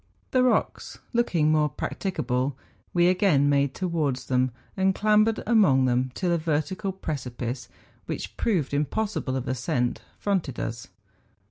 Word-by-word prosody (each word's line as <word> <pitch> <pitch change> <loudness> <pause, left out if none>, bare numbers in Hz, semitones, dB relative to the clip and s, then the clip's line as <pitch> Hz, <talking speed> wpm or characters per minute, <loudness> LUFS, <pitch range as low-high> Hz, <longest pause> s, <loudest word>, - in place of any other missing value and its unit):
The 255 - +3
rocks 255 -1 0 0.2
looking 175 -10 +2
more 150 -1 +3
prac¬ - - -5
ticable, 135 -8 -1 0.4
we 175 0 +4
again 180 -6 +3
made 140 -1 +2
towards 160 -8 -1
them, 130 0 +2 0.3
and 190 0 +2
clambered 215 +1 +3
among 190 - +4
them 125 +1 +1
till 180 -2 0
a 170 - +2
vertical 160 +5 -1
precipice, 125 -8 -5 0.4
which - - -5
proved 170 - 0
impossible 150 0 -1
of 130 0 -3
ascent, 125 -1 -1 0.2
fronted 185 - -1
us. 115 +1 -4
150 Hz, 135 wpm, -26 LUFS, 130-190 Hz, 0.4 s, we